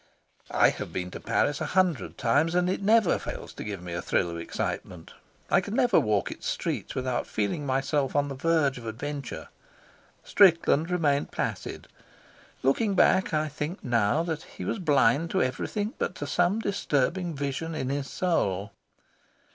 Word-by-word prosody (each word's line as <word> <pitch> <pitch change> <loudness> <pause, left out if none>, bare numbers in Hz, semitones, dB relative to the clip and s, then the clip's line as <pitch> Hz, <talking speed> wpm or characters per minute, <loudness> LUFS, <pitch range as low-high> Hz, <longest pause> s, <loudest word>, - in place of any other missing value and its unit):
I - - +5
have - - -6
been 90 -1 -4
to - - -7
Paris 145 -1 0
a - - -1
hundred 180 -8 +1
times, 145 +8 +2
and 180 0 +3
it 190 - -2
never 215 -1 +4
fails - - -7
to - - -7
give 100 -4 -6
me 90 -1 -6
a 85 - -2
thrill 85 0 0
of 85 - -5
excitement; 85 0 -5 0.4
I - - +5
can 205 +4 -5
never 240 -5 +4
walk 105 -2 0
its - - -7
streets - - -3
without 130 -1 -1
feeling 110 +8 -2
myself 135 +1 0
on 145 0 +2
the 140 - -4
verge 140 -2 +1
of 115 - -9
adventure. 140 +3 -5 0.7
Strickland 170 -4 +4
remained 150 -5 +1
placid. - - -4 0.8
Looking 195 - +2
back, 190 +1 +4
I 155 -1 +1
think 150 +5 -5
now 120 +5 +2
that 160 -3 -3
he - - -9
was - - -2
blind 145 -2 +3
to 190 - +2
everything 205 - -2
but 180 - -2
to 145 - -5
some 175 +7 +2
disturbing 175 - 0
vision 145 +4 -3
in 130 -4 -2
his 140 0 -2
soul. 105 - 0
145 Hz, 170 wpm, -27 LUFS, 125-175 Hz, 0.8 s, I